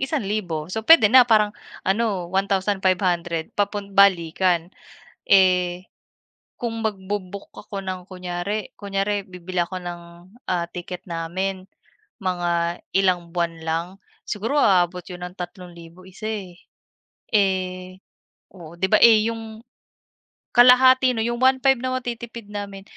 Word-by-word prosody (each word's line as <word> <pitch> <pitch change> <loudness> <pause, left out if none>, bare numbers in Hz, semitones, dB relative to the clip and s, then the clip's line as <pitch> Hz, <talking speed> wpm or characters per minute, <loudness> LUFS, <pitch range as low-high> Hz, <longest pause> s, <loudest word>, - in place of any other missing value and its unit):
1,000. 200 - -2
So, 220 - -2
puwede 275 -11 +7
na, 255 -1 +9
parang 210 -2 +4 0.3
ano 195 -3 0
1,500 185 -3 0
papun 200 -1 -2
balikan. 180 -2 +3 0.6
Eh, 180 -1 +3 0.7
kung 225 -2 -4
magbo-book 200 -1 -5
ako 200 -1 -7
ng 185 -1 -5
kunyari 180 +3 -4
kunyari 200 0 -2
bibili 180 0 -6
ako 180 +2 -3
ng, 175 -1 -6 0.5
ah, 175 -2 0
ticket 180 0 -7
namin, 185 +3 -3 0.5
mga 175 -2 -1 0.2
ilang 180 -3 +1
buwan 170 -1 -1
lang, 165 +1 -1 0.4
siguro 230 +8 -2
aabot 180 -2 +2
'yon 180 -1 -7
ng 180 - -18
3,000 175 -1 -10
isa, 205 +3 -9
eh. 195 -5 -6 0.8
Eh 185 -2 -1 0.6
oo, 170 -3 -12
'di 190 - +1
ba, - - +6
eh, 220 -1 +6
yung 225 -1 -8 0.9
kalahati 255 +1 +6
no'n, 225 -1 -1
yung - - -6
1,500 260 0 +4
na 255 0 -1
matitipid 235 -3 -6
namin, 200 -1 -6
190 Hz, 120 wpm, -22 LUFS, 175-215 Hz, 0.9 s, na